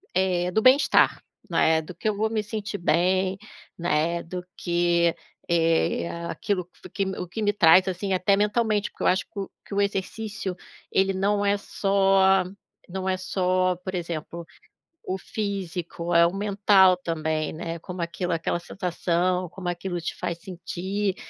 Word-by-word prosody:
eh, 180 -1 +1
do 220 - +2
bem 260 +2 +8
estar, 285 - +3 0.3
né, 160 0 +3
do 160 - -10
que 215 - -1
eu 205 - -1
vou 220 +1 +1
me 220 -1 -1
sentir 210 -1 -4
bem, 185 +2 +1 0.4
né, 170 0 0
do 180 +1 -6
que, 170 -1 +2 0.3
eh, 165 0 +2 0.2
aquilo 185 -4 -2
que 180 - -40
f - - -12
o - - -21
que 195 - -1 0.2
o 180 - -5
que 200 +6 -5
me 205 -1 +2
traz, 185 0 +6
assim, 190 +2 -2
até 185 +2 +3
mentalmente, 210 0 +1
porque - - -8
eu - - +3
acho 185 +1 +3
que 210 - -7
o 195 - -4 0.2
que - - -9
o 205 - +3
exercício 200 0 -3 0.4
ele 195 0 +2
não 200 +2 +1
é 200 0 +3
só 195 -1 +3 0.5
não 190 +1 -4
é 185 - +2
só, 185 -1 +1
por 185 +1 -6
exemplo, 170 0 -5 0.6
o 190 - 0
físico, 180 -5 -4
é 170 0 +7
o 175 - -4
mental 195 -2 +4
também, 160 -3 -2
né, 165 +1 -5
como 180 +1 -7
aquilo, 170 +1 -2
aquela 165 +1 -1
sensação, 180 0 -1
como 180 +1 -5
aquilo 175 0 -3
te - - -3
faz 170 -2 -3
sentir, 190 +2 -3
185 Hz, 170 wpm, -25 LUFS, 170-200 Hz, 0.6 s, bem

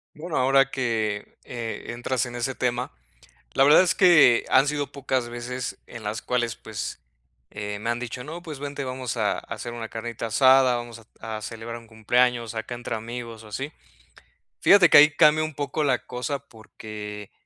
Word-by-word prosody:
Bueno, 160 +2 -4
ahora 135 +1 +4
que, 110 -5 -2
eh, 115 -2 -6
entras 120 0 -1
en 120 0 -8
ese 125 +2 -2
tema, 125 0 -1 0.6
la 135 - +5
verdad 150 +5 +7
es 185 -1 +1
que 165 -10 +6
han 135 +2 +5
sido 145 -1 -2
pocas 130 -3 -2
veces 120 +1 -5
en 115 -3 -10
las 105 +1 -3
cuales, 120 -3 -1
pues, 110 -2 -6 0.5
eh, 105 0 -5
me 115 - -2
han 120 - -1
dicho: 125 0 -6
"No, 165 +4 -8
pues 155 -5 -8
vente, 145 0 -5
vamos 130 -1 -4
a, - - +1
hacer 120 - -7
una 115 -1 -6
carnita 115 0 -5
asada, 130 +2 +5
vamos 120 -1 -7 0.2
a 110 -1 -5
a 110 - -7
celebrar 115 +1 -6
un 115 - -16
cumpleaños 120 +1 +1
acá 110 +2 -5
entre 120 -1 -5
amigos, 115 0 -7
o 110 - -12
así". 135 +8 -5 0.9
Fíjate 195 -4 +7
que - - +8
ahí 150 +1 +9
cambia 155 0 +5
un 155 -1 -4
poco 145 +2 -2
la 135 -4 0
cosa 125 +3 -3
porque, 105 -4 -10
120 Hz, 180 wpm, -25 LUFS, 115-135 Hz, 0.9 s, ahí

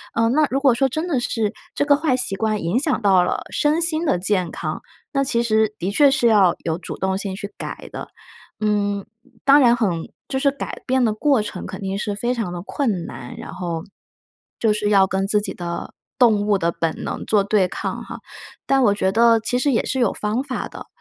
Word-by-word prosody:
嗯， 230 +1 +2
那 305 +1 +4
如 270 - 0
果 270 -4 +4
说 270 +2 +2
真 315 +7 -3
的 270 -8 0
是 220 -4 -1 0.2
这 285 - 0
个 285 -1 +5
坏 290 -4 +1
习 200 -6 0
惯 215 0 -1
影 170 +7 0
响 285 -4 0
到 190 -4 +4
了 - - -2
身 305 +3 +2
心 330 -1 +1
的 180 - +1
健 185 -2 0
康， - - -4 0.3
那 275 -1 +2
其 245 -3 0
实 220 -2 +2
的 180 - -2
确 280 +5 +5
是 245 -3 +3
要 200 -6 +5
有 160 -1 -1
主 170 - -7
动 190 0 -1
性 195 -1 -4
去 200 -1 -7
改 - - -7
的， - - -7 0.5
嗯， 205 -2 0 0.4
当 280 +1 +7
然 240 -2 +6
很 180 -8 -1 0.2
就 265 - -2
是 280 +1 +2
改 280 - -7
变 260 -1 +2
的 215 - +1
过 270 +2 +2
程 210 - -6
肯 - - -7
定 195 0 -3
是 210 0 -2
非 240 +5 -1
常 225 -7 -3
地 175 -1 -5
困 205 - -2
难， 125 - -9
然 - - -8
后， 170 -3 -4 0.8
就 220 -2 +3
是 210 0 -1
要 195 -2 +5
跟 190 +1 -1
自 210 +1 +3
己 205 - -4
的 170 -1 -5 0.3
动 215 -4 +4
物 205 -2 +3
的 170 -1 0
本 165 -1 -3
能 - - -4
做 205 -2 +3
对 200 -2 +2
抗 - - -4
哈。 - - -8 0.5
但 270 -1 +3
我 205 -3 +4
觉 190 -2 0
得 230 +1 +5
其 245 +3 -1
实 285 +1 +2
也 230 - +1
是 260 - -1
有 240 - +3
方 215 +4 -1
法 265 -3 -4
的， - - -10
215 Hz, 245 characters per minute, -21 LUFS, 195-260 Hz, 0.8 s, 当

